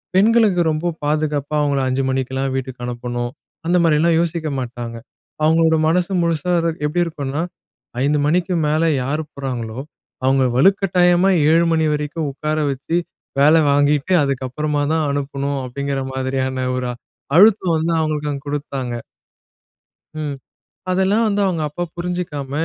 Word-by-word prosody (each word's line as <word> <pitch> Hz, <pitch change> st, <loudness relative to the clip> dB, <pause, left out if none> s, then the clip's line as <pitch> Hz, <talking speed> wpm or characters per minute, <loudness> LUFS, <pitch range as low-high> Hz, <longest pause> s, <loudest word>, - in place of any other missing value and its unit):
பெண்களுக்கு 210 Hz, -2 st, +4 dB
ரொம்ப 165 Hz, +3 st, -1 dB
பாதுகாப்பா, 150 Hz, -1 st, -1 dB
அவுங்கள 145 Hz, -1 st, +1 dB
5:00 130 Hz, +1 st, 0 dB
மணிக்கெல்லாம் 130 Hz, +1 st, -1 dB
வீட்டுக்கு 130 Hz, -2 st, -5 dB
அனுப்பணும். 120 Hz, 0 st, -4 dB, 0.3 s
அந்த 175 Hz, +2 st, +2 dB
மாரில்லாம் 165 Hz, +1 st, +3 dB
யோசிக்க 165 Hz, -2 st, -1 dB
மாட்டாங்க. 120 Hz, -1 st, -6 dB, 0.5 s
அவங்களோட 160 Hz, +1 st, +4 dB
மனசு 180 Hz, +3 st, +1 dB
முழுசா 170 Hz, +1 st, 0 dB
இரு 165 Hz, 0 st, +1 dB, 0.2 s
எப்படி 165 Hz, +4 st, 0 dB
இருக்கும்ன்னா, 145 Hz, -2 st, -3 dB, 0.6 s
"5:00 145 Hz, +1 st, +2 dB
மணிக்கு 180 Hz, +4 st, +1 dB
மேல 155 Hz, +2 st, +1 dB, 0.2 s
யார் 150 Hz, +4 st, -1 dB
போறாங்களோ, 125 Hz, -4 st, -5 dB, 0.4 s
அவுங்கள 130 Hz, 0 st, +3 dB
வலுக்கட்டாயமா 180 Hz, +1 st, +4 dB, 0.2 s
7:00 165 Hz, +1 st, +4 dB
மணி 160 Hz, -1 st, +2 dB
வரைக்கும் 150 Hz, +1 st, -3 dB
உட்கார 155 Hz, +3 st, -3 dB
வச்சு 140 Hz, +6 st, -2 dB, 0.4 s
வேலை 155 Hz, +3 st, +6 dB
வாங்கீட்டு, 145 Hz, +4 st, +2 dB
அதுக்கப்பறமா 140 Hz, +2 st, -1 dB
தான் 160 Hz, -1 st, +1 dB
அனுப்பணும்." 140 Hz, 0 st, -2 dB
அப்படீங்கிற 140 Hz, +2 st, -3 dB
மாதிரியான 130 Hz, 0 st, -2 dB
ஒரு 125 Hz, -1 st, -2 dB, 0.5 s
அழுத்தம் 195 Hz, -4 st, +5 dB
வந்து, 165 Hz, +1 st, 0 dB
அவங்களுக்கு 150 Hz, -1 st, -1 dB
அங்க 140 Hz, +1 st, -7 dB
குடுத்தாங்க. 135 Hz, -4 st, -3 dB, 1.3 s
ம். 145 Hz, -2 st, -3 dB, 0.5 s
அதெல்லாம் 190 Hz, +5 st, +2 dB
வந்து 205 Hz, -1 st, +1 dB
அவுங்க 170 Hz, -4 st, 0 dB
அப்பா 175 Hz, +4 st, -4 dB
புரிஞ்சிக்காம, 170 Hz, -6 st, -4 dB
150 Hz, 130 wpm, -20 LUFS, 135-170 Hz, 1.3 s, வேலை